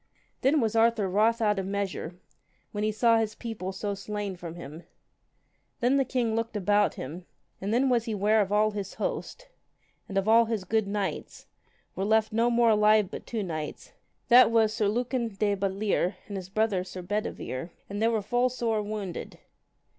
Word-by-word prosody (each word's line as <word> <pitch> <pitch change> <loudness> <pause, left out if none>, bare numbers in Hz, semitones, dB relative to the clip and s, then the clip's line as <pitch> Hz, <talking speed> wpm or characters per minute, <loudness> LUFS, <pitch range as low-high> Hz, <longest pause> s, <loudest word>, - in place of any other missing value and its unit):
Then 290 +3 +3
was 225 -3 0
Arthur 225 -2 +3
wroth 220 +5 +2
out 210 -2 +2
of 190 - -3
measure, 195 -4 -3 0.6
when 210 0 -3
he 215 - +1
saw 230 +1 +3
his 220 -1 -2
people 220 -5 -5
so 200 +1 -3
slain 200 -1 -4
from 170 -2 -8
him. 160 -1 -9 1.0
Then 250 +3 +3
the 270 - +2
king 240 -4 0
looked 230 -1 -2
about 205 +1 +2
him, 170 +7 -7 0.3
and 195 +2 -2
then 250 +4 +3
was 240 -3 +2
he 225 - -2
ware 210 +2 +3
of 200 -1 -2
all 215 +1 +3
his 200 -2 -5
host, - - -4 0.6
and 195 - -3
of 195 +1 +1
all 230 +1 +6
his 220 -3 -2
good 215 +2 0
knights, 200 -5 -4 0.5
were 190 - -2
left 220 +1 +2
no 230 +2 +3
more 235 -1 +4
alive 210 -1 +4
but - - -8
two 225 -3 -2
knights, 155 -4 -6 0.3
that 250 0 +8
was 225 -2 +3
Sir 215 -3 +1
Lucan 240 +3 -1
de 205 0 +1
Butlere, 195 -1 0
and 205 - -6
his 185 -1 -6
brother 210 -2 +1
Sir 185 0 -8
Bedivere: 175 -7 -4 0.2
and 205 +1 -5
they 225 - +4 0.2
full 245 +4 0
were - - +3
sore 230 -3 -1
wounded. 205 -4 -5
210 Hz, 185 wpm, -28 LUFS, 195-230 Hz, 1.0 s, that